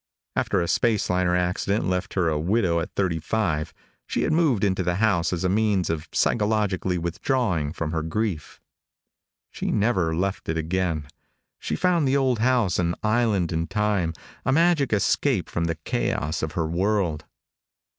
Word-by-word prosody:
After -, -, +1 dB
a 85 Hz, -, -1 dB
space 110 Hz, -2 st, +1 dB
liner 90 Hz, -1 st, +2 dB
accident 90 Hz, +4 st, 0 dB
left 90 Hz, 0 st, -2 dB
her 90 Hz, -3 st, +2 dB
a 75 Hz, -2 st, 0 dB
widow 90 Hz, 0 st, +1 dB
at 85 Hz, -, -3 dB
thirty 90 Hz, -5 st, 0 dB
five, 80 Hz, -4 st, -1 dB, 0.4 s
she -, -, -1 dB
had 155 Hz, -, +1 dB
moved 155 Hz, -, +2 dB
into 95 Hz, -2 st, +1 dB
the 90 Hz, 0 st, 0 dB
house 95 Hz, -5 st, +2 dB
as 90 Hz, 0 st, -2 dB
a -, -, +2 dB
means 100 Hz, -2 st, +1 dB
of 80 Hz, -1 st, -4 dB
psychologically 105 Hz, -4 st, +1 dB
withdrawing 85 Hz, -, -1 dB
from 80 Hz, -1 st, -4 dB
her 80 Hz, -1 st, -1 dB
grief. 80 Hz, -1 st, -3 dB, 0.9 s
She -, -, -4 dB
never 95 Hz, -7 st, +1 dB
left 95 Hz, +1 st, -2 dB
it 80 Hz, -, 0 dB
again. 80 Hz, -2 st, -1 dB, 0.5 s
She -, -, -3 dB
found 175 Hz, -5 st, +2 dB
the 135 Hz, +1 st, +3 dB
old 130 Hz, -4 st, +1 dB
house 115 Hz, -7 st, +2 dB
an 85 Hz, -1 st, 0 dB
island 110 Hz, -5 st, +1 dB
in 80 Hz, 0 st, -1 dB
time, 105 Hz, -5 st, 0 dB, 0.3 s
a -, -, +1 dB
magic 165 Hz, -2 st, +3 dB
escape 105 Hz, +1 st, +1 dB
from 85 Hz, -, -2 dB
the 85 Hz, -1 st, -1 dB
chaos 75 Hz, +1 st, -1 dB
of 80 Hz, -1 st, -3 dB
her 85 Hz, -2 st, -1 dB
world. 85 Hz, -2 st, 0 dB
95 Hz, 165 wpm, -24 LUFS, 85-110 Hz, 0.9 s, the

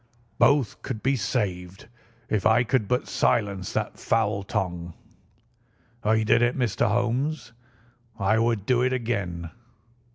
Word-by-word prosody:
Both 140 Hz, -7 st, +3 dB
could 110 Hz, -, -5 dB
be 135 Hz, +2 st, +2 dB
saved 95 Hz, -5 st, -3 dB, 0.4 s
if 105 Hz, -3 st, 0 dB
I 110 Hz, +2 st, +4 dB
could 120 Hz, -3 st, 0 dB
but 125 Hz, +3 st, 0 dB
silence 100 Hz, -4 st, 0 dB
that -, -, -3 dB
foul 105 Hz, -3 st, +1 dB
tongue. 90 Hz, -3 st, -3 dB, 1.1 s
I 110 Hz, +1 st, +2 dB
did 115 Hz, +2 st, +3 dB
it, 120 Hz, +2 st, +2 dB
Mr. 120 Hz, -6 st, +1 dB
Holmes. 120 Hz, +4 st, -1 dB, 0.7 s
I 110 Hz, +2 st, +2 dB
would 115 Hz, -3 st, 0 dB
do 125 Hz, 0 st, +2 dB
it 130 Hz, +1 st, +1 dB
again. 100 Hz, -9 st, -3 dB
110 Hz, 130 wpm, -25 LUFS, 100-120 Hz, 1.1 s, I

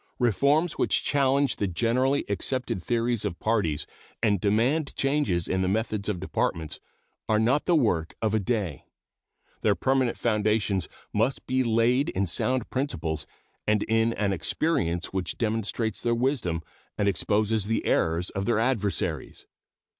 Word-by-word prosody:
Reforms 140 Hz, -, +2 dB
which -, -, +2 dB
challenge 140 Hz, -2 st, +2 dB
the 100 Hz, -, 0 dB
generally 125 Hz, +9 st, +1 dB
accepted 100 Hz, -1 st, -2 dB
theories 120 Hz, -1 st, 0 dB
of 85 Hz, -, -3 dB
parties 100 Hz, -10 st, 0 dB, 0.4 s
and 100 Hz, -5 st, +2 dB
demand 125 Hz, +9 st, +1 dB
changes 135 Hz, -, +1 dB
in 95 Hz, -, 0 dB
the 95 Hz, -, +1 dB
methods 105 Hz, 0 st, -1 dB
of 95 Hz, -4 st, -2 dB
Departments 80 Hz, -3 st, -2 dB, 0.5 s
are 110 Hz, -, +4 dB
not 120 Hz, +7 st, +2 dB
the 175 Hz, -, +3 dB
work 90 Hz, -, +1 dB
of 110 Hz, -2 st, 0 dB
a 110 Hz, -, +3 dB
day. 100 Hz, -, -2 dB, 0.8 s
Their 105 Hz, -2 st, +3 dB
permanent 130 Hz, -1 st, +1 dB
foundations 105 Hz, -4 st, +1 dB, 0.2 s
must 115 Hz, +6 st, 0 dB
be 130 Hz, 0 st, +1 dB
laid 120 Hz, +4 st, +2 dB
in 95 Hz, +1 st, 0 dB
sound 125 Hz, +7 st, 0 dB
principles 130 Hz, -, -2 dB, 0.4 s
and 105 Hz, -1 st, +3 dB
in 115 Hz, +1 st, +2 dB
an 100 Hz, -3 st, 0 dB
experience 85 Hz, -, -1 dB
which 95 Hz, -1 st, -2 dB
demonstrates 110 Hz, -1 st, -1 dB
their 120 Hz, 0 st, +1 dB
wisdom 115 Hz, -, 0 dB, 0.3 s
and 100 Hz, -, +1 dB
exposes 105 Hz, +2 st, +1 dB
the 115 Hz, -, -1 dB
errors 85 Hz, +2 st, +1 dB
of 95 Hz, 0 st, -3 dB
their 120 Hz, -2 st, +2 dB
adversaries. 105 Hz, -, -1 dB
110 Hz, 145 wpm, -27 LUFS, 95-125 Hz, 0.8 s, are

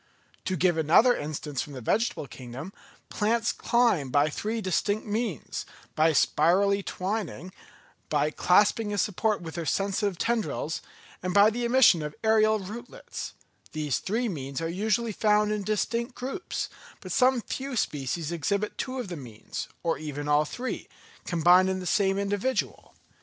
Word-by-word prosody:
To 185 Hz, -, 0 dB
give 170 Hz, 0 st, +2 dB
another 175 Hz, -, +5 dB
instance 150 Hz, -2 st, -4 dB
from 145 Hz, -, -7 dB
the 130 Hz, -, -6 dB
vegetable 220 Hz, -, 0 dB
kingdom: 130 Hz, +8 st, -9 dB, 0.4 s
plants 225 Hz, +2 st, +1 dB
climb 235 Hz, -, +2 dB
by 145 Hz, +3 st, +3 dB
three 220 Hz, +8 st, -2 dB
distinct 205 Hz, +2 st, 0 dB
means, 215 Hz, -, -3 dB, 0.3 s
by 160 Hz, +1 st, +4 dB
spirally 190 Hz, +7 st, +3 dB
twining, 185 Hz, -3 st, -4 dB, 0.6 s
by 150 Hz, 0 st, +1 dB
clasping 205 Hz, +5 st, +3 dB
a 205 Hz, -, -2 dB
support 210 Hz, +1 st, 0 dB
with 160 Hz, -1 st, -7 dB
their 170 Hz, -1 st, -4 dB
sensitive 195 Hz, 0 st, 0 dB
tendrils, 220 Hz, -9 st, -1 dB, 0.4 s
and 180 Hz, 0 st, -3 dB
by 205 Hz, +2 st, +7 dB
the 240 Hz, +2 st, -2 dB
emission 235 Hz, -9 st, +5 dB
of 150 Hz, 0 st, -6 dB
aërial 215 Hz, -2 st, +3 dB
rootlets; 240 Hz, -, -7 dB, 0.4 s
these 150 Hz, -4 st, -1 dB
three 230 Hz, +5 st, -1 dB
means 140 Hz, -, -4 dB
are 165 Hz, -, -2 dB
usually 215 Hz, +6 st, 0 dB
found 210 Hz, 0 st, +2 dB
in 210 Hz, -1 st, -1 dB
distinct 230 Hz, +4 st, -1 dB
groups, 270 Hz, +9 st, -4 dB, 0.3 s
but -, -, -8 dB
some 255 Hz, -1 st, +4 dB
few 270 Hz, +3 st, -5 dB
species 150 Hz, -, -2 dB
exhibit 200 Hz, +6 st, -1 dB
two 260 Hz, 0 st, -3 dB
of 245 Hz, -, -4 dB
the 180 Hz, -, -5 dB
means, 120 Hz, -6 st, -7 dB, 0.2 s
or 165 Hz, -4 st, 0 dB
even 145 Hz, -1 st, -5 dB
all 150 Hz, +1 st, +4 dB
three, 250 Hz, +11 st, -5 dB, 0.4 s
combined 180 Hz, +2 st, +5 dB
in 190 Hz, 0 st, -1 dB
the 185 Hz, -, -6 dB
same 195 Hz, +1 st, +2 dB
individual. 205 Hz, +6 st, -2 dB
195 Hz, 150 wpm, -27 LUFS, 155-220 Hz, 0.6 s, by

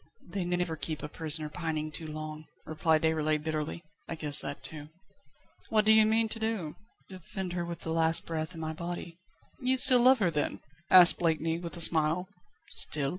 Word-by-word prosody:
"They 190 Hz, +1 st, -3 dB
never 175 Hz, -2 st, -2 dB
keep 155 Hz, -1 st, -4 dB
a -, -, -4 dB
prisoner 155 Hz, 0 st, -1 dB
pining 155 Hz, -1 st, -4 dB
too 160 Hz, +2 st, -4 dB
long," 155 Hz, 0 st, -7 dB, 0.2 s
replied 155 Hz, 0 st, 0 dB
Déroulède 155 Hz, -1 st, 0 dB
bitterly. 155 Hz, +1 st, -4 dB, 0.3 s
"I 165 Hz, -, -4 dB
guessed 150 Hz, -2 st, +5 dB
that 140 Hz, +1 st, -7 dB
too." 150 Hz, -1 st, -10 dB, 0.8 s
"What 215 Hz, -1 st, +2 dB
do 220 Hz, -, +6 dB
you 220 Hz, 0 st, +5 dB
mean 225 Hz, +1 st, +2 dB
to 225 Hz, -, -6 dB
do?" 220 Hz, -9 st, -3 dB, 0.3 s
"Defend 185 Hz, 0 st, -7 dB
her 175 Hz, -1 st, -3 dB
with 170 Hz, 0 st, -7 dB
the 160 Hz, -, -3 dB
last 165 Hz, 0 st, +3 dB
breath 160 Hz, +1 st, -5 dB
in -, -, -9 dB
my 160 Hz, 0 st, -4 dB
body." 170 Hz, +1 st, -7 dB, 0.4 s
"You 260 Hz, 0 st, +1 dB, 0.2 s
love 255 Hz, +2 st, +6 dB
her 190 Hz, -7 st, 0 dB
still, 150 Hz, -2 st, 0 dB
then?" -, -, -7 dB, 0.3 s
asked 180 Hz, -1 st, +7 dB
Blakeney, 165 Hz, -1 st, -1 dB
with 170 Hz, 0 st, -7 dB
a -, -, +2 dB
smile. 160 Hz, +3 st, +3 dB, 0.4 s
"Still?" 140 Hz, -2 st, +1 dB
165 Hz, 185 wpm, -29 LUFS, 155-180 Hz, 0.8 s, asked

